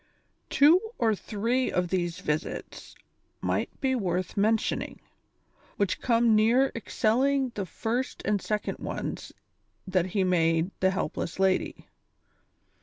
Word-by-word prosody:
Two 310 +6 +6 0.2
or 225 -2 +2
three 230 +5 -1
of 180 -1 0
these 175 -1 -2
visits 150 -4 -4 0.4
may - - -1
be 265 -2 +1
worth 185 -6 -1
mentioning, 215 +2 0 0.8
whicli 200 -2 0
come 235 -2 +3
near 235 +5 +4
excelling 255 +4 +1
the 200 -3 -4
first 240 +7 -3
and 205 -1 +1
second 210 0 -3
ones - - -5 0.5
that 185 -2 +1
he 190 +1 0
made 165 -1 +2
the 190 - +3
helpless 170 -3 -3
lady. 190 -1 0
210 Hz, 115 wpm, -27 LUFS, 185-240 Hz, 0.8 s, Two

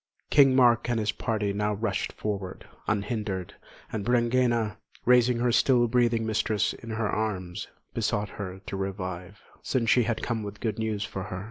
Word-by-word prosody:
King 135 -3 +6
Mark 120 -2 +4
and 120 -2 +1
his 105 -1 +1
party 105 -4 -1
now 105 +1 0
rushed 105 -1 -1
forward, 100 -3 -4 0.2
unhindered; 105 -3 -2 0.4
and 105 -2 -3
Brangæna, 120 -2 +2 0.3
raising 125 0 +5
her 120 +1 +2
still 120 0 +4
breathing 120 -1 +2
mistress 110 -1 +1
in 115 - -11
her 110 -1 -1
arms, 95 -5 -2 0.3
besought 105 -2 -1
her 95 -2 -7
to - - -5
revive, 95 0 -5 0.2
since 120 -4 +1
she 125 - +5
had 115 -1 -2
come 115 -2 -1
with 105 0 -7
good 110 -3 -2
news 110 -2 -1
for 95 -1 -5
her. 95 -3 -5
110 Hz, 165 wpm, -27 LUFS, 100-120 Hz, 0.4 s, King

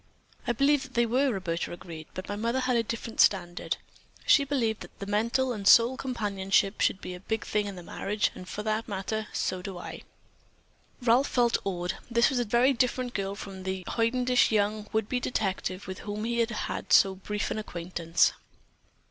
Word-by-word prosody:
"I - - +3
believe 280 +3 +3
that 260 -1 -10
they 235 0 +4
were," 260 +4 +2
Roberta 175 -5 -2
agreed, 165 -3 -8
"but 185 - -6
my 205 - -3
mother 230 +5 0
had 255 -1 +1
a 235 - +4
different 230 0 -2
standard. 175 -3 +2 0.5
She 280 - +6
believed 250 -6 0 0.2
that 200 - -6
mental 235 +5 +1
and 200 -3 -3
soul 235 +5 +7
companionship 205 -6 0
should 190 - +2
be 180 - -6
the 180 - -8
big 220 +3 -3
thing 210 -1 0
in 185 -3 -7
marriage, 210 +4 -1
and 185 0 -10
for 210 - -4
that 215 +1 -1
matter, 210 +1 -3
so 185 -1 -2
do 185 0 -6
I." 175 - -7 1.0
Ralph 245 +3 +4
felt 240 -2 +2
awed. 180 -2 -2
This 235 +3 +4
was 255 - 0
a 240 - +1
very 240 +5 +4
different 250 0 0
girl 195 0 -2
from 195 -2 -8
the 190 0 -3
hoidenish 245 +2 +2
young 210 0 0
would 220 -1 0
be 250 - 0
detective 195 -5 -2
with 185 0 -6
whom 210 +1 -5
he 235 +1 -1
had 230 -2 -2
so 195 -1 +6
brief 205 +2 -3
an - - -1
acquaintance. 170 -3 0
215 Hz, 185 wpm, -28 LUFS, 190-240 Hz, 1.0 s, soul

